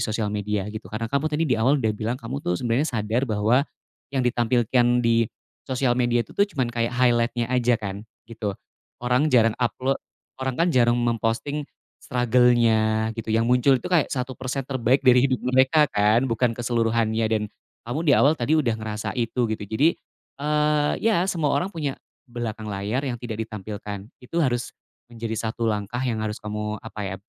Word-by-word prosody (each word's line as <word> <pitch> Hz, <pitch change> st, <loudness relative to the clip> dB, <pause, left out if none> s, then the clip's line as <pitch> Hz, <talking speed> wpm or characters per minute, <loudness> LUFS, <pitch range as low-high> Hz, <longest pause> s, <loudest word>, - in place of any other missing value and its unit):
social 110 Hz, -1 st, -1 dB
media, 105 Hz, -1 st, -2 dB
gitu. 110 Hz, +1 st, -8 dB
Karena 110 Hz, +1 st, -4 dB
kamu 140 Hz, +3 st, +1 dB
tadi 155 Hz, +2 st, 0 dB
di 125 Hz, -, +2 dB
awal 135 Hz, +6 st, +4 dB
udah 110 Hz, -3 st, +1 dB
bilang 110 Hz, +3 st, -3 dB
kamu 130 Hz, +5 st, -5 dB
tuh 90 Hz, -8 st, -1 dB
sebenarnya 120 Hz, -, 0 dB
sadar 115 Hz, +1 st, -1 dB
bahwa 110 Hz, +6 st, +2 dB, 0.5 s
yang 130 Hz, -2 st, 0 dB
ditampilkan 120 Hz, 0 st, +2 dB
di 115 Hz, -1 st, +3 dB, 0.4 s
social 130 Hz, -2 st, 0 dB
media 120 Hz, -1 st, +2 dB
itu -, -, -16 dB
tuh 200 Hz, -, +5 dB
cuman 130 Hz, -9 st, -1 dB
kayak 120 Hz, +1 st, -1 dB
highlight-nya 120 Hz, -1 st, +2 dB
aja 125 Hz, -1 st, +3 dB
kan, 100 Hz, -1 st, -5 dB, 0.3 s
gitu. 105 Hz, -4 st, -4 dB, 0.4 s
Orang 125 Hz, +5 st, +2 dB
jarang 115 Hz, -1 st, +4 dB
uploa 130 Hz, +2 st, 0 dB, 0.4 s
orang 130 Hz, -1 st, -2 dB
kan 170 Hz, +2 st, +2 dB
jarang 120 Hz, -2 st, +4 dB
memposting 120 Hz, +5 st, -1 dB, 0.3 s
struggle-nya 115 Hz, -3 st, +2 dB
gitu, 115 Hz, -1 st, -5 dB
yang 115 Hz, +1 st, +2 dB
muncul 125 Hz, +2 st, +4 dB
itu -, -, -8 dB
kayak 175 Hz, -4 st, +2 dB
1% 130 Hz, +1 st, -3 dB
terbaik 130 Hz, +1 st, +1 dB
dari 125 Hz, 0 st, +7 dB
hidup 130 Hz, -, +1 dB
mereka 130 Hz, +4 st, +3 dB
kan, 105 Hz, +1 st, +2 dB
bukan 120 Hz, 0 st, +1 dB
keseluruhannya 115 Hz, -2 st, 0 dB
dan 110 Hz, -1 st, +1 dB, 0.4 s
kamu 120 Hz, +6 st, -3 dB
di 160 Hz, -, +2 dB
awal 145 Hz, +3 st, +5 dB
tadi 150 Hz, +3 st, +1 dB
udah 130 Hz, -7 st, +2 dB
ngerasa 110 Hz, -1 st, -4 dB
itu, 120 Hz, +1 st, 0 dB
gitu. 110 Hz, -, -4 dB
Jadi, 145 Hz, +10 st, +3 dB, 0.5 s
eee, 150 Hz, 0 st, +2 dB
iya 200 Hz, -5 st, +2 dB
semua 160 Hz, -6 st, 0 dB
orang 160 Hz, +7 st, 0 dB
punya 150 Hz, -7 st, -3 dB, 0.3 s
belakang 115 Hz, -3 st, -5 dB
layar 105 Hz, +7 st, -2 dB
yang 125 Hz, -, -2 dB
tidak 115 Hz, -3 st, -5 dB
ditampilkan, 105 Hz, -1 st, -6 dB, 0.2 s
itu 125 Hz, +7 st, -9 dB
harus 120 Hz, -4 st, -1 dB, 0.3 s
menjadi 115 Hz, -1 st, -5 dB
1 115 Hz, +1 st, -4 dB
langkah 105 Hz, +4 st, -3 dB
yang 120 Hz, -4 st, -1 dB
harus 110 Hz, 0 st, -4 dB
kamu, 105 Hz, 0 st, -3 dB
apa 115 Hz, -2 st, -8 dB
ya, 95 Hz, -, -4 dB
120 Hz, 175 wpm, -24 LUFS, 110-130 Hz, 0.5 s, dari